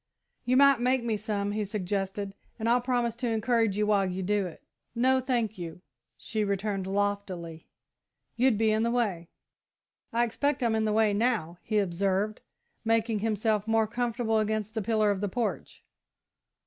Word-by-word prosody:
"You 255 +1 +3
might 275 -2 +6
make 250 0 +2
me 230 -2 0
some," 205 -1 -2
he 210 +1 -1
suggested, 195 0 -3 0.2
"and 225 -1 -2
I'll 240 +1 +4
promise 240 -2 0
to 245 0 -2
encourage 225 -2 +1
you 210 - +2
while 205 -2 +3
you 185 +1 -3
do 200 0 +1
it." 170 - -12 0.3
"No, 260 +2 +3
thank 240 -6 -1
you," 170 +1 -7 0.3
she 215 -2 -2
returned 200 -1 -1
loftily; 195 -5 -2 0.7
"you'd 245 -2 +3
be 220 0 +3
in 215 0 +2
the 230 - +1
way." 205 -9 -1 0.8
"I 235 +1 +2
expect 265 +3 0
I'm 230 -2 +2
in 220 0 +1
the 215 - +1
way 215 -1 +3
now," 205 -7 0
he 215 - -1
observed, 195 +2 0 0.4
making 225 -1 +1
himself 215 0 0
more 225 0 +3
comfortable 230 0 0
against 215 0 -1
the 220 - -1
pillar 215 0 +2
of 200 -1 -2
the 205 - -1
porch. 215 -4 -3
215 Hz, 170 wpm, -28 LUFS, 200-235 Hz, 0.8 s, might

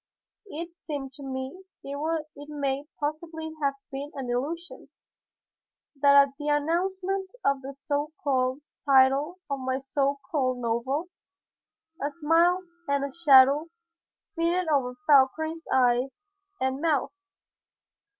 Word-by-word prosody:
It 340 0 -7
seemed 280 -4 -5
to 280 +2 -11
me 265 +6 -5 0.2
it 300 +1 -4
may 280 -1 -2
possibly 315 +2 -4
have 280 -1 +1 0.2
been 280 +2 -5
an 260 -3 -4
illusion 320 +8 -4 1.1
that 280 0 +5
at 280 0 +7
the 295 - -4
announcement 375 +6 0 0.2
of 275 -1 +2
the 270 +1 -6
so 285 +2 -2
called 260 0 +1 0.2
title 275 +4 +4
of 280 -1 -3
my 260 0 -1
so 275 +1 0
called 260 -5 +1
novel, 245 +8 -2 0.9
a 285 - 0
smile 335 +4 +3 0.2
and 280 0 +1
a 280 - -7
shadow 285 -1 +6 0.7
flitted 340 +2 0
over 260 -4 +1
Fauchery's 315 +3 +3
eyes 255 +8 +2 0.3
and 265 +1 -1
mouth. 315 -1 +1
285 Hz, 120 wpm, -27 LUFS, 270-320 Hz, 1.1 s, at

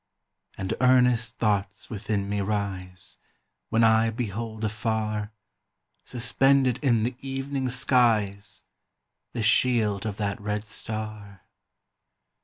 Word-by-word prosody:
And 95 - -2
earnest 125 -2 +3
thoughts 100 -1 -1
within 100 -2 -2
me 100 0 -1
rise, 95 -3 -4 0.5
When 115 +1 +3
I 110 0 +5
behold 110 -1 -4
afar, 110 -1 -2 0.7
Suspended 130 +1 +2
in 120 -6 +3
the 120 +2 -1
evening 135 0 -3
skies 115 -6 +1 0.7
The 115 - -2
shield 110 -3 +3
of 105 -2 -4
that 100 0 -2
red 105 0 -2
star. 105 -2 -6
110 Hz, 100 wpm, -26 LUFS, 105-120 Hz, 0.7 s, I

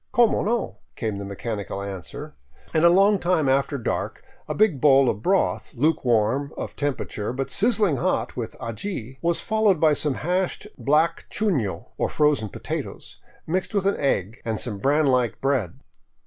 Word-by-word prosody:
" - - -47
Como 240 -3 +4
no? 230 +3 -1
" - - -46
came 110 -4 -3
the 100 - -5
mechanical 100 0 -5
answer, 100 -3 -7 0.4
and 160 0 +2
a 170 - +8
long 195 +3 +5
time 175 -5 +1
after 140 +2 +1
dark 120 - -3 0.2
a - - -3
big 200 -11 +2
bowl 135 -2 +6
of 105 -3 -1
broth, 190 - 0
luke 150 +6 +1
warm 120 +4 +1
of - - -5
temperature 130 -7 -3
but 135 +2 -4
sizzling 210 - +2
hot - - -1
with - - -5
aji, 130 - -5
was 170 0 +1
followed 215 -6 +2
by 155 -1 +5
some 145 -1 0
hashed 180 +6 -1
black 150 +7 +1
chuno, 155 - -1
or - - +1
frozen 150 -8 +2
potatoes,, - - -6 0.3
rnixed 185 +5 -2
with 195 -1 +1
an 200 - +3
tgg, 115 -6 -1
and 110 -2 -2
some 105 -5 -3
bran 145 +7 +2
like 125 -4 +1
bread. 130 -10 -1
140 Hz, 175 wpm, -24 LUFS, 115-180 Hz, 0.4 s, a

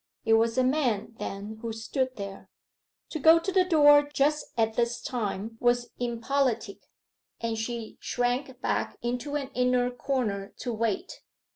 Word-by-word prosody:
It 225 - +4
was 225 +2 +3
a 255 - +4
man, 255 -6 0
then, 205 +2 -6
who 230 -1 -3
stood 255 +4 -2
there. 200 -1 -8 0.6
To 315 - -3
go 320 +3 +7
to 335 +4 -2
the 375 -1 +4
door 290 -5 +7
just 295 +1 +1
at 225 -1 +2
this 235 +1 0
time 225 -2 -3
was 240 0 +1
impolitic, 240 -2 -1 0.6
and 230 -1 -2
she 225 0 -4
shrank 250 +1 -1
back - - -1
into 250 +4 -2
an 275 -2 -2
inner 250 0 +2
corner 235 -6 -2
to 245 - -3
wait. 225 - -2
245 Hz, 150 wpm, -28 LUFS, 225-275 Hz, 0.6 s, go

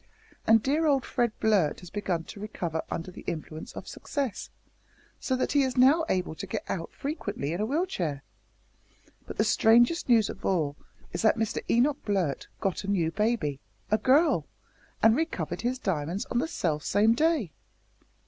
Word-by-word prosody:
And 225 -1 +6
dear 305 +4 +2
old 275 -3 +2
Fred 240 -3 0
Blurt 205 -9 +2
has 180 - -11
begun 185 -5 -2
to 200 - -10
recover 175 -6 -3
under 170 +3 -4
the - - -11
influence 160 -1 -5
of - - -8
success, 275 -8 -4 0.7
so 260 - -1
that 255 - -1
he 285 - +4
is 260 -1 -1
now 285 +6 +5
able 180 -3 0
to 195 - -7
get - - -3
out 165 -3 -4
frequently 205 - -4
in 175 - -2
a 215 - 0
wheel 310 +8 +1
chair. 155 - -3 1.0
But - - -7
the 215 - +3
strangest 235 +8 +4
news 225 -4 +5
of - - -8
all 155 -6 0 0.4
is 175 - -2
that 220 +1 +4
Mister 220 -1 -1
Enoch 270 +5 +2
Blurt 185 - -1
got 195 +1 -1
a - - -6
new 175 -5 +1
baby 205 - 0 0.3
a 215 - +3
girl 275 +9 +3 0.6
and 225 0 +7
recovered 320 +4 -2
his 250 +2 -1
diamonds 180 - -2
on 240 - +2
the 315 - 0
self 160 - -1
same 215 +3 +3
day!" 300 - +1
215 Hz, 175 wpm, -28 LUFS, 175-260 Hz, 1.0 s, and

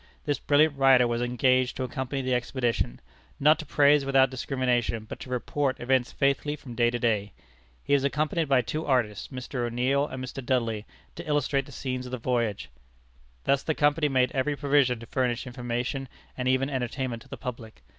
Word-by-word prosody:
This 145 -3 0
brilliant 150 +1 +3
writer 130 -2 +6
was 120 0 -1
engaged 125 +1 +2
to 130 - -2
accompany 130 +2 -3
the 130 0 0
expedition 120 - -1 0.4
not 150 +3 +5
to 155 - -7
praise 145 0 +4
without 135 -1 +3
discrimination, 125 -4 -1
but - - -7
to - - -9
report 130 +2 -1
events 125 0 +1
faithfully 140 +2 0
from 135 -4 -10
day 120 0 +3
to 120 - -2
day. 105 -4 0 0.5
He - - 0
was 140 -1 +4
accompanied 150 +2 0
by 130 -2 +4
two 155 +8 -3
artists, 120 -8 0
Mr. 125 -1 -5
O'Neill 125 +4 +1
and 130 -2 -6
Mr. 130 +1 -7
Dudley, 115 -4 -1 0.3
to 170 0 -9
illustrate 145 -2 0
the - - -11
scenes 130 -1 -4
of - - -9
the 130 - -2
voyage. 115 - -1 0.7
Thus 140 0 +2
the 155 - -1
Company 150 +1 +2
made 130 -2 +2
every 145 +1 0
provision 140 -4 +2
to - - -8
furnish 125 +1 -1
information 125 +2 -3 0.3
and 125 0 -3
even 130 +1 +2
entertainment 125 -2 -3
to - - -17
the 135 - -7
public. 115 - -8
130 Hz, 185 wpm, -27 LUFS, 120-140 Hz, 0.7 s, writer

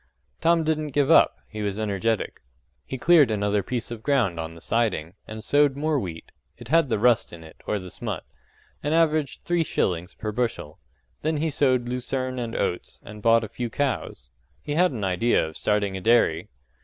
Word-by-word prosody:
Tom 165 0 +3
didn't 155 -2 -1
give 145 -2 +3
up - - +6
he 105 0 -7
was 100 0 -2
energetic. 110 +1 -1 0.5
He 130 - -4
cleared 150 0 +5
another 105 -1 +1
piece 120 +4 -4
of 115 -2 -6
ground 115 - +1
on 80 0 -5
the - - -12
siding, 95 -6 -1
and 110 0 -7
sowed 145 +3 +3
more 150 0 0
wheat; 85 -7 -7 0.3
it 120 - -12
had 165 -2 +3
the 115 - +1
rust 120 +2 +3
in 85 -1 -10
it, 80 - -15
or 105 - 0
the 90 -2 -8
smut - - -5 0.6
and 150 +2 0
averaged 155 -3 +1
three 175 -1 +1
shillings 90 - -2
per 110 - -4
bushel. 115 -9 -3 0.4
Then 155 0 0
he 160 +1 0
sowed 130 -4 +2
lucerne 130 +1 -3
and 115 -2 -4
oats, 90 - -3
and 105 0 -10
bought 115 +1 +4
a - - -4
few 120 +3 -5
cows: 115 - -3 0.3
he 145 - -3
had 180 +4 +4
an 115 -6 -5
idea 95 +4 +2
of 80 - -10
starting 105 -2 0
a 95 - -5
dairy. 90 -7 +3
115 Hz, 190 wpm, -25 LUFS, 100-145 Hz, 0.6 s, up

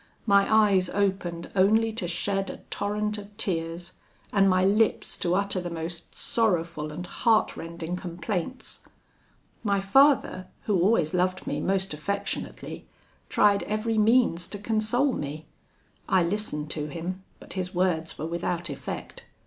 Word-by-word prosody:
My 200 -1 +4
eyes 205 -4 +4
opened 190 -4 -1
only 220 +4 +4
to 215 -5 -2
shed 195 +3 -1
a - - -8
torrent 210 +1 -1
of 205 0 -12
tears, 170 -4 -2 0.4
and 195 -1 +5
my 185 0 +3
lips 210 +2 +2
to 175 0 +1
utter 200 -1 0
the 175 - -4
most 170 0 -6
sorrowful 170 -8 0
and 175 +4 -6
heartrending 175 -5 0
complaints. 180 +6 -4 0.8
My 200 -2 +2
father, 205 -3 +4 0.2
who 200 -5 +1
always 175 -5 +3
loved 185 +1 0
me - - -2
most 190 -2 0
affectionately, 200 +7 -4 0.4
tried 205 -1 +4
every 215 +1 0
means 215 -6 +3
to 205 - -5
console 225 +6 +1
me. 150 -1 -5 0.6
I 185 - +4
listened 170 -5 -2
to 150 -1 -2
him, 175 +5 -5 0.2
but - - -9
his 185 -1 -4
words 175 -3 0
were 155 - -4
without 170 0 -2
effect. 140 - -7
190 Hz, 140 wpm, -27 LUFS, 170-210 Hz, 0.8 s, and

